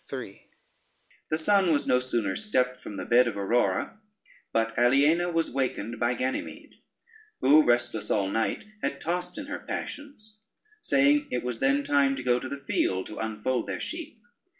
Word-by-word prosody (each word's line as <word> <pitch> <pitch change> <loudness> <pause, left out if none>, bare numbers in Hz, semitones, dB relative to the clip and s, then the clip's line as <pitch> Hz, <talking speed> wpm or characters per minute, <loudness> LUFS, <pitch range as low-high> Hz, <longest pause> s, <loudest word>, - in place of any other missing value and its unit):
] - - -17
The - - -6 1.0
sun 190 +2 +3
was 145 - +1
no 125 - +3
sooner 120 -6 -1
stepped 125 -12 0
from 105 - -8
the 95 -2 -5
bed 120 +1 +5
of 105 -3 -3
Aurora, 100 - 0 0.5
but 115 0 0
Aliena 145 +8 +3
was 165 -1 0
wakened 120 -4 -2
by 120 +1 +1
Ganymede, 130 +2 -5 0.6
who, 145 +4 +6
restless 120 -3 +1
all 100 -2 +1
night, 110 +3 -1 0.2
had 140 - -2
tossed 180 +1 -3
in 295 - -5
her 290 - -5
passions, 220 -8 -7 0.4
saying 140 +1 +3
it 125 - -2
was 125 -2 -4
then 140 +1 +2
time 140 -1 +2
to 130 - -6
go 125 -1 +2
to 130 - -6
the 140 0 -7
field 95 -7 0
to - - -8
unfold 110 +3 -2
their - - -3
sheep. 320 -8 -6
130 Hz, 170 wpm, -27 LUFS, 120-160 Hz, 1.0 s, who